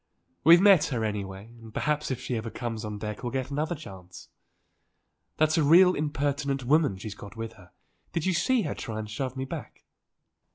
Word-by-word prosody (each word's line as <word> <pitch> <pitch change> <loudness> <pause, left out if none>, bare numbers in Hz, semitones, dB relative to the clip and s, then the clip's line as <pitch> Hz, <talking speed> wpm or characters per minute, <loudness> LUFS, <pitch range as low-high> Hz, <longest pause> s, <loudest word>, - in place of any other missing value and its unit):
"We've 170 +3 +8
met 190 -5 +6
her, 120 -5 -1
anyway, 100 +1 -5
and 115 -1 -11
perhaps 150 +5 -1
if 130 - -2
she 125 - -3
ever 115 0 -3
comes 115 -2 -5
on 105 -1 -5
deck 105 0 -5
we'll 120 -2 -3
get 130 0 -3
another 155 +4 -1
chance. 95 - -12 1.1
That's 155 +1 +3
a - - +3
real 180 +5 +7
impertinent 145 -3 -1
woman 145 -6 +3
she's 100 +2 -6
got 100 +1 -11
with 115 0 -5
her. 90 -2 -17 0.4
Did 165 -2 -2
you 190 - +2
see 245 +7 +2
her 150 - -2
try 110 -4 -6
and 110 0 -4
shove 130 +4 -4
me 130 - -2
back?" - - -8
130 Hz, 195 wpm, -27 LUFS, 110-150 Hz, 1.1 s, We've